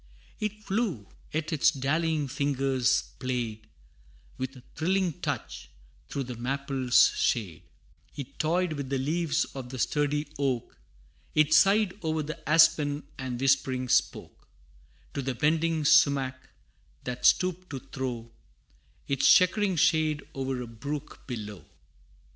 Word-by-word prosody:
It 215 0 -4
flew, 195 - -2 0.2
yet 155 +2 -2
its 155 +1 +4
dallying 155 +1 0
fingers 135 -2 +1 0.2
played, 120 -4 -3 0.7
With 130 +1 -4
a 125 - -14
thrilling 180 +1 0
touch, - - -4 0.4
through 140 - -3
the 125 -1 -6
maple's 130 0 +2
shade; 100 -9 -1 0.5
It 140 -1 -8
toyed 170 +2 +1
with 140 -3 -5
the 135 - 0
leaves 155 +4 0
of 130 -2 -7
the 130 - -7
sturdy 150 +3 0
oak, 130 -4 -1 0.6
It 155 0 +4
sighed 200 +2 +4
o'er 160 -1 -1
the 155 +1 -7
aspen, 150 -2 +4 0.2
and 130 -2 -4
whispering 130 -1 +1
spoke - - 0 0.7
To 140 - -2
the 135 -1 -3
bending 160 +3 +1
sumach, 135 -2 +3 0.5
that 125 0 -5
stooped 185 +6 +3
to 135 - -5
throw 120 -3 -5 0.8
Its 140 -1 +4
chequering 190 +1 +4
shade 155 -1 +2
o'er 135 -2 -3
a - - -8
brook 140 +6 -7
below. 105 - -6
140 Hz, 125 wpm, -28 LUFS, 130-160 Hz, 0.8 s, its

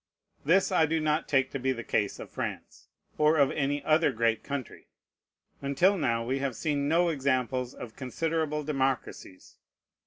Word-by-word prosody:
This 185 +7 +3
I 160 -4 +4
do 160 +1 0
not 155 0 0
take 135 -2 +2
to 135 - -4
be 130 +1 0
the 120 -2 -6
case 105 -3 -1
of - - -10
France, - - -6 0.3
or 155 +1 +4
of 140 -2 +4
any 145 0 -1
other 155 +2 +3
great 115 0 0
country. 140 -3 -6 0.7
Until 140 +8 +3
now, 115 -9 0
we 130 +3 -1
have 135 -3 -2
seen 145 +2 -1
no 170 +3 +3
examples 130 -4 -1
of 115 -3 -9
considerable 150 +3 -2
democracies. 135 -9 -3
140 Hz, 160 wpm, -28 LUFS, 130-155 Hz, 0.7 s, I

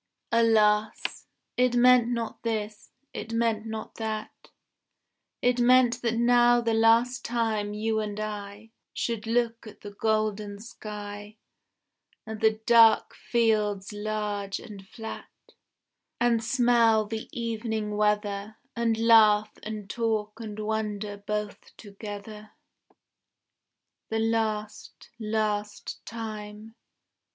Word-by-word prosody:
Alas! 220 -2 +2 0.3
it 250 -1 +3
meant 245 -1 +6
not 235 -2 -3
this, 215 -2 -4 0.2
it 225 - -6
meant 230 -1 0
not 220 -1 -6
that: 220 -1 -5 0.9
It 245 0 +2
meant 245 0 +4
that 230 -1 0
now 240 0 +5
the 230 -1 0
last 230 +3 +3
time 220 -3 -1
you 220 +1 0
and 210 -1 -4
I 210 0 -6 0.2
Should 230 -2 -2
look 230 0 0
at 215 - -13
the 205 - -8
golden 215 -1 -1
sky, 210 -1 -8 0.9
And 220 -1 -7
the 220 -1 +3
dark 230 -1 +6
fields 210 -4 0
large 210 -1 -3
and 195 -2 -11
flat, 220 +1 -8 0.9
And 235 -1 +2
smell 235 -2 +3
the 220 +1 -6
evening 220 -2 -3
weather, 210 0 0 0.2
And 230 -2 +1
laugh 220 -2 +5
and 215 -2 -6
talk 220 -1 -2
and 215 -2 -7
wonder 210 -1 -3
both 210 0 -5
together. 210 0 -9 1.6
The 225 - -1
last, 220 -1 -2
last 210 -1 -2
time. 215 -1 -7
220 Hz, 110 wpm, -27 LUFS, 210-230 Hz, 1.6 s, meant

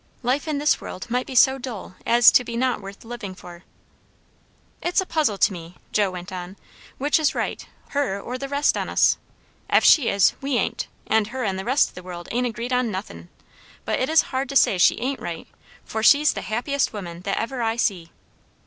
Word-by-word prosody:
Life 260 +6 0
in 305 -2 -1
this 295 +2 +2
world 185 - -7
might 250 +1 0
be 265 - -7
so 265 +2 +5
dull 235 -7 -7
as 235 0 +7
to 250 - +4
be 235 -1 -5
not 250 -3 0
worth 195 +2 -11
living 225 -5 -7
for. 175 -1 -12 1.2
"It's 350 - +1
a 380 - 0
puzzle 300 - 0
to 200 - +3
me," 170 0 -10 0.2
Joe 205 -2 +2
went 180 -1 -8
on, 185 +1 -7 0.4
"which 290 +4 +2
is 310 - +1
right, - - -3 0.3
her 275 -9 -1
or 250 +5 -6
the 275 +1 -5
rest 285 +1 +2
on - - -3
us. - - +3 0.5
Ef - - +4
she 285 -7 +6
is, 200 -1 +4
we 275 -2 0
ain't. - - -2 0.2
And 220 -1 +2
her 255 +3 -5
and 190 -3 -1
the 190 - -6
rest 260 +4 +2
o' - - -27
the 180 - -9
world 175 -1 -8
ain't 245 +1 0
agreed 235 +2 -4
on 250 -1 +1
nothin'. 135 - -7 0.6
But - - -1
it 260 - 0
is 320 0 +5
hard 260 0 -1
to 275 - -5
say 195 -8 +4
she - - +5
ain't 265 +2 -2
right, 165 -1 -6 0.4
for 220 - -4
she's 290 +6 +5
the - - -5
happiest 265 +6 -1
woman 175 -5 -7
that 195 +2 -2
ever 245 +2 -3
I 225 -1 0
see." 190 -8 -1
235 Hz, 215 wpm, -23 LUFS, 190-265 Hz, 1.2 s, as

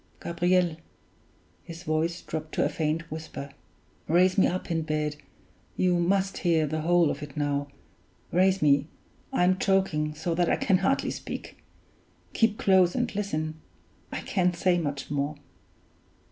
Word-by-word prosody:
Gabriel" 175 -1 +1 0.9
(his 170 +1 -9
voice 165 +1 -1
dropped 155 0 -5
to - - +2
a - - +1
faint 160 +1 -2
whisper), 155 -3 -7 0.6
"raise 180 +3 +4
me 195 - +4
up 185 0 -3
in 165 -1 +1
bed 155 -1 -1 0.6
you 180 -1 +3
must 190 +2 +1
hear 165 -3 +2
the 155 +1 -2
whole 170 -1 +3
of 140 - -6
it 145 -1 -9
now; 145 -1 0 0.6
raise 190 +1 +3
me; 145 0 +4 0.4
I'm 185 +1 +2
choking 190 -6 +1
so 160 +2 -2
that 175 0 +1
I - - +3
can 190 -3 +2
hardly 270 +8 +1
speak. - - -7 0.7
Keep 225 -2 +2
close 185 -2 +4
and 245 -3 -1
listen 155 -6 -3 0.5
I - - -4
can't 180 -2 +1
say 175 0 +2
much 145 -3 -4
more. 145 +1 -1
170 Hz, 145 wpm, -27 LUFS, 155-185 Hz, 0.9 s, raise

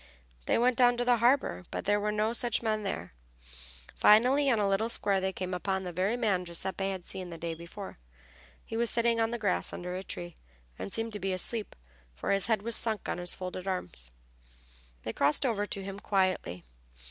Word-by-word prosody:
They - - +3
went 245 +1 +3
down 245 -1 +6
to 245 - 0
the 245 -1 +5
harbor, 235 - +2
but - - -4
there 205 +1 +3
were 210 +1 0
no 215 +2 +1
such 240 -1 +1
men 215 -1 +1
there. 90 - -4 0.8
Finally 255 +7 +5
in 235 - +4
a 205 -1 +2
little 195 +4 +1
square 200 -4 +2
they 190 0 0
came 185 -1 -4
upon 190 +1 -1
the 180 - -4
very 190 +7 0
man 205 -7 +1
Giuseppe 190 +3 -2
had 190 -2 -4
seen 185 -2 -6
the 165 - -7
day 165 0 -3
before. 170 - -9 0.7
He - - -6
was 235 0 +1
sitting 235 -1 +2
on 225 - +2
the 240 - -2
grass 90 - 0
under 180 0 -5
a 185 - -3
tree, 175 -2 -6 0.4
and - - -4
seemed 225 +1 -2
to 210 - -3
be 190 0 -1
asleep, 210 +4 -3 0.4
for - - -2
his 195 -1 +3
head 220 -3 +1
was 230 0 0
sunk 220 -3 -1
on - - -2
his 175 0 +1
folded 185 0 -5
arms. 90 - -3 0.9
They - - -3
crossed 145 - +2
over 205 -4 0
to 195 - -4
him 195 +1 -6
quietly. 185 - 0
200 Hz, 205 wpm, -30 LUFS, 180-230 Hz, 0.9 s, down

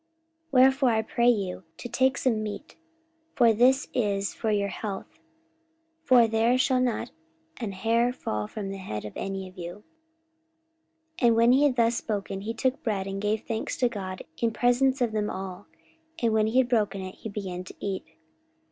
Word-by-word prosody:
44:027:034 325 - -47 0.4
Wherefore 265 0 +5
I 220 -1 +2
pray 235 +2 +2
you 195 -5 0
to - - -6
take 260 +3 +2
some 230 -4 +1
meat: 215 +7 -6 0.6
for 235 -3 +5
this 255 +5 +4
is 200 -5 0
for 225 - -3
your 200 -1 +1
health: 205 +10 -6 0.8
for 250 -6 +6
there 225 +3 +2
shall 255 0 +2
not 245 -3 -1 0.5
an 225 -5 -4
hair 230 +5 +2
fall 105 - -3
from 195 - -5
the 195 - -6
head 105 - -5
of 105 - -7
any 195 -1 -4
of 185 0 -14
you. 175 +4 -7 1.4
44:027:035 240 - +4
And 230 - +5
when 230 +1 +5
he 270 +3 +5
had 275 -4 +2
thus 235 -1 +3
spoken, 195 -3 -3
he 220 +3 -3
took 260 +3 0
bread, 200 -4 -1
and 195 0 -4
gave 210 +1 0
thanks 225 -1 -3
to 245 - +2
God 190 -5 -6 0.2
in 230 - +2
presence 250 +3 +2
of 240 -2 +2
them 210 -1 -1
all: 190 0 -6 0.5
and 230 -2 +1
when 215 0 +3
he 225 +4 0
had 260 -2 +4
broken 210 -5 +1
it, 185 0 -6
he 220 - -8
began 190 -3 -5
to - - -11
eat. 195 -2 -3
220 Hz, 190 wpm, -27 LUFS, 195-245 Hz, 1.4 s, for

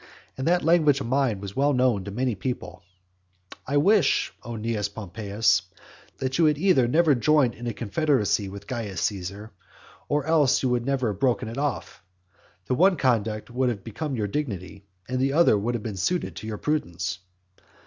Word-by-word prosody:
And 130 - -3
that 175 +1 +3
language 155 -4 +4
of 140 - -4
mine 130 -4 +1
was 100 -1 -7
well 145 +2 +2
known 125 -6 +2
to - - -5
many 125 +4 -1
people, 120 +5 -5 0.9
"I 140 +2 +1
wish, 185 0 +3
O 120 - -7
Cnaeus 105 -2 -2
Pompeius, 105 +1 0 0.6
that 130 +3 -2
you 165 - +5
had 150 -1 +3
either 155 -8 +3
never 155 +4 +4
joined 130 0 +3
in 120 - -7
a 120 - -2
confederacy 105 -3 0
with 100 +1 -9
Caius 110 -6 -4
Caesar, 100 +2 -3 0.6
or 145 -1 0
else 155 -4 +3
that - - -1
you 125 - +2
had 120 0 -1
never 130 -6 0
broken 120 +3 0
it 115 +4 -5
off. 145 -5 -3 0.6
The - - -1
one 180 +6 +4
conduct 115 -4 0
would 125 +1 +1
have 105 -5 -4
become 135 +5 -4
your 110 -3 -1
dignity, 100 - -4 0.2
and 130 0 -2
the 135 +1 +1
other 165 -7 +5
would 115 +4 -1
have 110 - -4
been 105 -4 -5
suited 175 - -1
to 110 - -7
your 110 -1 -4
prudence." 95 - -2
120 Hz, 185 wpm, -25 LUFS, 105-145 Hz, 0.9 s, you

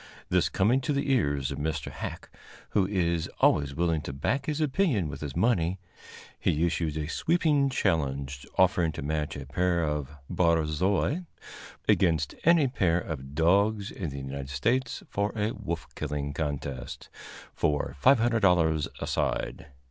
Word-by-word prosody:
This - - +2
coming 120 +8 +2
to 145 - -1
the 140 0 0
ears 70 - +1
of - - -4
Mr. 75 -1 -2
Hacke, - - -6 0.4
who 95 -2 +2
is 85 -4 0
always 70 -2 +3
willing 85 -1 +1
to 70 - -6
back 110 - -1
his 150 0 -1
opinion 145 - +1
with 70 0 -7
his 75 -3 -5
money, 95 -6 +2 0.6
he 80 +3 +1
issued 80 -2 -1
a 75 - -2
sweeping 150 - +2
challenge 70 - -1
offering 90 -3 +3
to 70 - -6
match 75 0 -2
a 70 -1 -6
pair 85 +4 +1
of 75 -3 -2 0.2
barzois 85 - +1 0.6
against 85 -4 +2
any 165 -4 +5
pair 90 -9 +1
of 70 -5 -6
dogs 100 +5 +2
in 90 -5 -4
the 70 - -7
United 70 0 -5
States 115 - 0
for 100 +1 -1
a 105 0 0
wolf 85 -2 -4
killing 70 -1 -3
contest, 70 -3 -4 0.5
for 75 -1 0
$500 100 - +4
a - - -1
side. - - -2
85 Hz, 150 wpm, -28 LUFS, 75-105 Hz, 0.6 s, any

